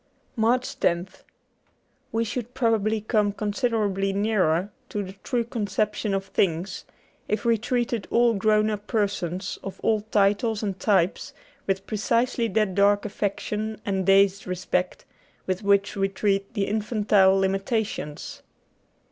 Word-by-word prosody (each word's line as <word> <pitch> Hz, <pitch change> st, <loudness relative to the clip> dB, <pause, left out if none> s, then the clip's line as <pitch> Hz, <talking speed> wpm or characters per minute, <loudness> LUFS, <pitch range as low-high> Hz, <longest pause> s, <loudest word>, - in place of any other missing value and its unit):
' -, -, -41 dB
75 225 Hz, -, -5 dB
MARCH 245 Hz, +3 st, +1 dB
loth 175 Hz, +2 st, 0 dB, 0.9 s
WE 225 Hz, +1 st, +1 dB
should 240 Hz, +2 st, -5 dB
probably 220 Hz, -3 st, +1 dB
come 210 Hz, -1 st, +1 dB
considerably 205 Hz, -2 st, 0 dB
nearer 195 Hz, -3 st, +1 dB, 0.2 s
to 205 Hz, -, -2 dB
the 190 Hz, -, -7 dB
true 245 Hz, -3 st, 0 dB
conception 210 Hz, -2 st, -1 dB
of 195 Hz, 0 st, -2 dB
things 190 Hz, 0 st, -1 dB, 0.4 s
if 215 Hz, +2 st, -2 dB
we 230 Hz, -1 st, +4 dB
treated 235 Hz, -1 st, -1 dB
all 235 Hz, 0 st, +4 dB
grown 215 Hz, +1 st, +2 dB
up 210 Hz, 0 st, -5 dB
persons, 195 Hz, -4 st, -2 dB
of 195 Hz, -, -7 dB
all 220 Hz, -2 st, +2 dB
titles 210 Hz, +1 st, +1 dB
and 195 Hz, -3 st, -3 dB
types, 190 Hz, -3 st, +1 dB, 0.3 s
with 195 Hz, 0 st, -1 dB
precisely 230 Hz, +2 st, 0 dB
that 215 Hz, -2 st, +1 dB
dark 200 Hz, +1 st, +3 dB
affection 210 Hz, +1 st, -3 dB
and 190 Hz, -2 st, -1 dB
dazed 195 Hz, 0 st, +4 dB
respect 180 Hz, 0 st, -2 dB, 0.4 s
with 185 Hz, +1 st, -2 dB
which 200 Hz, 0 st, +2 dB
we 195 Hz, -1 st, +1 dB
treat 195 Hz, 0 st, 0 dB
the 200 Hz, -2 st, +1 dB
infantile 205 Hz, -2 st, +3 dB
limitations. 195 Hz, -4 st, -2 dB
205 Hz, 135 wpm, -25 LUFS, 195-220 Hz, 0.9 s, we